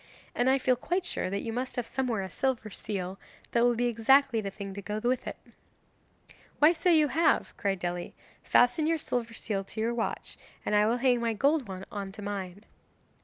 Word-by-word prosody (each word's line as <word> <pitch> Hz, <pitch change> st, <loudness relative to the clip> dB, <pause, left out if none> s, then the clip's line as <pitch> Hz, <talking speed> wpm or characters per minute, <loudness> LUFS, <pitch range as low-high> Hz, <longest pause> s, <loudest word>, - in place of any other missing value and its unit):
And 245 Hz, +2 st, +2 dB
I 265 Hz, -, +5 dB
feel 255 Hz, -1 st, +2 dB
quite 355 Hz, +9 st, -2 dB
sure 185 Hz, -, -2 dB
that 200 Hz, +1 st, -2 dB
you 225 Hz, -, -3 dB
must 255 Hz, +2 st, -3 dB
have 245 Hz, -, -2 dB
somewhere 235 Hz, -5 st, -1 dB
a 190 Hz, -, -5 dB
silver 245 Hz, -3 st, -1 dB
seal, 190 Hz, -2 st, -4 dB, 0.3 s
that 235 Hz, -, +2 dB
will 240 Hz, 0 st, +4 dB
be 240 Hz, +2 st, 0 dB
exactly 240 Hz, +1 st, +4 dB
the 200 Hz, -, -3 dB
thing 195 Hz, 0 st, -7 dB
to 200 Hz, -, -6 dB
go 210 Hz, +2 st, -4 dB
with 245 Hz, +3 st, 0 dB
it.' -, -, -5 dB, 1.2 s
'Why, 300 Hz, +2 st, +7 dB
so 350 Hz, +2 st, 0 dB
you 310 Hz, -4 st, +5 dB
have,' 325 Hz, +3 st, +2 dB
cried 195 Hz, -1 st, -1 dB
Dely; 175 Hz, 0 st, -4 dB, 0.3 s
'fasten 245 Hz, +6 st, +3 dB
your 330 Hz, 0 st, +2 dB
silver 235 Hz, -6 st, -3 dB
seal 200 Hz, -4 st, -2 dB
to 215 Hz, -, -8 dB
your 230 Hz, +2 st, +1 dB
watch, 230 Hz, -2 st, -3 dB, 0.3 s
and -, -, -1 dB
I 210 Hz, 0 st, +5 dB
will 235 Hz, +2 st, +2 dB
hang 250 Hz, -1 st, +3 dB
my 230 Hz, -1 st, +1 dB
gold 280 Hz, +3 st, +2 dB
one 190 Hz, 0 st, -7 dB
on 200 Hz, -2 st, -5 dB
to 210 Hz, -1 st, -9 dB
mine. 200 Hz, -1 st, -5 dB
230 Hz, 210 wpm, -29 LUFS, 200-260 Hz, 1.2 s, Why